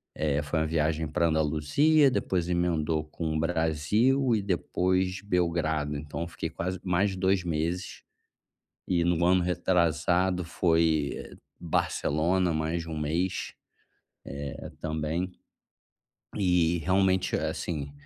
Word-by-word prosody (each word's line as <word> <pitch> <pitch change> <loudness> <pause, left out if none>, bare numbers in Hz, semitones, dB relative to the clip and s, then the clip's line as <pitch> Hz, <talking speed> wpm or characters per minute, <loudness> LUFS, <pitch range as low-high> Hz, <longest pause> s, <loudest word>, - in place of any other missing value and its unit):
eh, 75 -1 0
foi 75 +2 -1
uma 80 - 0
viagem 80 0 0
pra 85 +2 +1
Andaluzia, 80 - +3
depois 90 -8 -1
emendou 85 -3 0
com 80 +1 -4
o 80 - 0
Brasil, 90 - +2
e 105 - 0
depois 95 0 0
Belgrado, 85 -6 0
então 75 +2 -6
eu 85 - -3
fiquei 85 - -5
quase 90 +1 -4
mais 95 +2 +1
de 95 - -6
2 95 0 +2
meses. 85 +2 -3 0.8
E 85 -2 +2
no 85 -1 +1
ano 90 0 +4
retrasado, 90 +1 +1
foi, 80 -3 +1
eh, - - -9 0.2
Barcelona, 85 +2 0
mais 80 +2 -1
de 85 - -9
1 80 - -4
mês, 85 +5 -2 1.0
eh, - - -8
também. 80 +4 -2 1.0
E, 90 -3 +2
realmente, 95 +2 +2
a - - -1
assim, 75 -5 -4
85 Hz, 130 wpm, -28 LUFS, 80-95 Hz, 1.0 s, ano